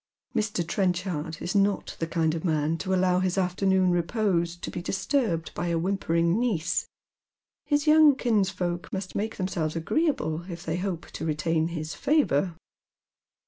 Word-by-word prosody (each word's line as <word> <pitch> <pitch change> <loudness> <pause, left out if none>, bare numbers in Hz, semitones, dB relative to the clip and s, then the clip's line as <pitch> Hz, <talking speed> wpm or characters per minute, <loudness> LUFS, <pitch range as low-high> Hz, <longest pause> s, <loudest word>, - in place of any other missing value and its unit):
Mr. 205 -6 0
Trenchard 180 -5 -1
is 175 - -2
not 200 0 +1
the 165 - -1
kind 165 -2 +1
of 160 - -4
man 155 -2 +1
to 190 - -3
allow 185 -1 +3
his 185 0 0
afternoon 185 0 +2
repose 175 -1 0
to 175 - -7
be 175 - -4
disturbed 195 - -1
by 175 - -3
a 170 -1 +1
whimpering 170 0 +1
niece. 210 -10 0 0.8
His 290 0 +2
young 305 -2 +7
kinsfolk 190 -7 0
must 190 -1 -4
make 220 +2 -3
themselves 170 -5 -2
agjeeable 175 - -1
if 170 -1 -7
they 160 +1 -1
hope 180 -3 -4
to - - -6
retain 160 +1 0
his 160 -2 -4
favour. 190 - +1
180 Hz, 150 wpm, -27 LUFS, 165-200 Hz, 0.8 s, young